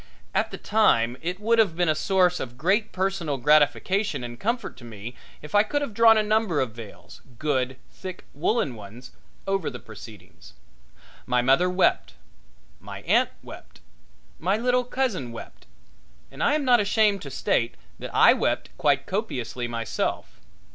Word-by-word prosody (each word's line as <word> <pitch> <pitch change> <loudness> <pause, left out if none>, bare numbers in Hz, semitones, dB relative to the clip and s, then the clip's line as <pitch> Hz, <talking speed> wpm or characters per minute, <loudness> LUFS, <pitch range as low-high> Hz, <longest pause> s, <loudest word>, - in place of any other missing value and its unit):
At - - +1
the - - -7
time 125 - +2
it 180 +3 -3
would 230 +2 +2
have 195 -7 +3
been 175 0 +1
a 155 - +4
source 180 +2 +2
of 120 -1 -7
great 200 - +1
personal 185 -6 -1
gratification 150 - +2
and 120 0 -7
comfort 235 +3 -2
to 125 - -14
me 115 0 -8 0.3
if 150 - -10
I 205 - +6
could 290 +7 -1
have 230 - -5
drawn 225 +1 +6
a 215 - +3
number 215 -7 +1
of 130 -3 -1
veils, 110 -2 -12 0.2
good, 130 -3 -1
thick, 185 -2 -9
woolen 150 - 0
ones, 110 +3 -11 0.3
over 195 -3 -1
the 125 - -7
proceedings. 110 -5 -13 0.7
My 125 -1 +2
mother 135 +8 +3
wept, 180 +1 +1 0.6
my - - -9
aunt - - +3
wept, - - -12 0.6
my 190 +5 +1
little 250 +2 +1
cousin 235 - -2
wept, 115 - -11 0.6
and - - -9
I 290 - +3
am 300 -2 -1
not 245 -2 +5
ashamed 210 -1 +2
to 140 - -7
state 120 -2 0 0.2
that - - -6
I - - +6
wept - - -2
quite 140 -2 +2
copiously 125 - -3
myself. 115 -1 -3
170 Hz, 160 wpm, -25 LUFS, -, 0.7 s, I